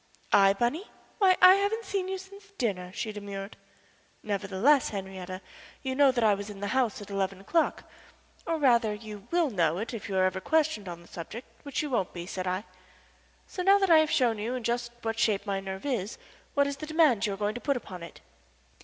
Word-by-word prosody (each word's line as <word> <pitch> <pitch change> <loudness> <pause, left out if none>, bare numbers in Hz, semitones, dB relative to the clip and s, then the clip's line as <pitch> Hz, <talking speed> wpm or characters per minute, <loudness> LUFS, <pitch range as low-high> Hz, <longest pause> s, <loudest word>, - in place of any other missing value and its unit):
"I, 195 -1 +6
Bunny? 245 - -1 0.3
Why, 375 -3 +5
I 370 - +11
haven't 415 +3 -1
seen 385 -1 -2
you 380 0 -2
since 395 +2 -12
dinner," 180 -6 -2
she 215 +3 -4
demurred. 200 -1 -7 0.7
"Nevertheless, 205 +7 +2
Henriette, 190 -2 -6 0.4
you 260 -1 -2
know 275 0 +5
that 240 -2 0
I 215 -2 +5
was 200 +1 -4
in 205 -1 -9
the 205 0 -3
house 245 -6 0
at 205 - -12
eleven 195 -1 -1
o'clock 315 - 0
last - - -25
night - - -1
or, 325 - +1
rather, 235 -7 +3
you 210 -1 -10
will 340 -5 +2
know 170 -5 +1
it 225 +5 -4
if 215 -3 -6
you 195 - -3
are 185 - +4
ever 190 0 -1
questioned 305 - +1
on 170 0 -8
the - - -18
subject, 180 +8 -8 0.2
which 285 +1 -2
you 295 - -4
won't 195 -7 0
be," 175 -1 -6
said 185 0 -4
I. 185 +2 -1 0.8
"So, 365 - -5
now 390 +2 +6
that 390 -3 +2
I 320 - +9
have 310 -1 +2
shown 235 -7 +2
you 230 +4 -2
in 250 - -4
just 240 +1 -1
what 225 0 -2
shape 210 -3 +2
my 200 -2 -1
nerve 190 +2 -6
is, 230 -7 -2 0.4
what 285 0 +4
is 280 0 -3
the 305 - -7
demand 300 -9 +3
you 200 - -2
are - - -13
going 205 +1 -1
to 245 - -7
put 280 -3 +1
upon 185 -7 -9
it?" 170 - -11
220 Hz, 225 wpm, -28 LUFS, 195-285 Hz, 0.8 s, I